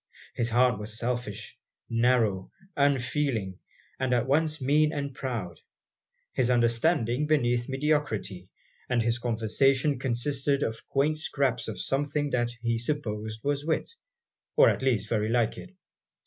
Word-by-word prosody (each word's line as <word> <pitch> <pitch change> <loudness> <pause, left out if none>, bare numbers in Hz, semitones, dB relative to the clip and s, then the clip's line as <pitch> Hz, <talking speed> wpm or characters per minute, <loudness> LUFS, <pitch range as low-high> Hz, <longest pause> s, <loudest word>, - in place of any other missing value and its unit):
His 120 0 -1
heart 120 -1 +3
was 105 +1 -3
selfish, 120 -3 -4 0.3
narrow, 115 -5 +2 0.3
unfeeling, 135 -7 0 0.4
and 130 -1 +1
at 120 - +1
once 155 +3 +1
mean 150 +3 +3
and 140 -3 -4
proud; 115 -11 -5 0.7
his 125 -2 +1
understanding 120 +3 +2
beneath 120 -5 +1
mediocrity; 135 -10 -1 0.4
and 120 -2 +2
his 115 +1 0
conversation 125 +4 +1
consisted 135 +3 0
of 110 0 -4
quaint 150 +3 +1
scraps 135 -6 -1
of 110 -4 -5
something 145 +6 -1
that 120 -1 +1
he 115 -1 0
supposed 110 -5 -3
was 145 0 0
wit, 160 +1 -1 0.6
or - - +7
at - - -4
least 120 -6 +1
very 110 -1 0
like 115 -1 +1
it. - - -11
125 Hz, 135 wpm, -28 LUFS, 115-140 Hz, 0.7 s, or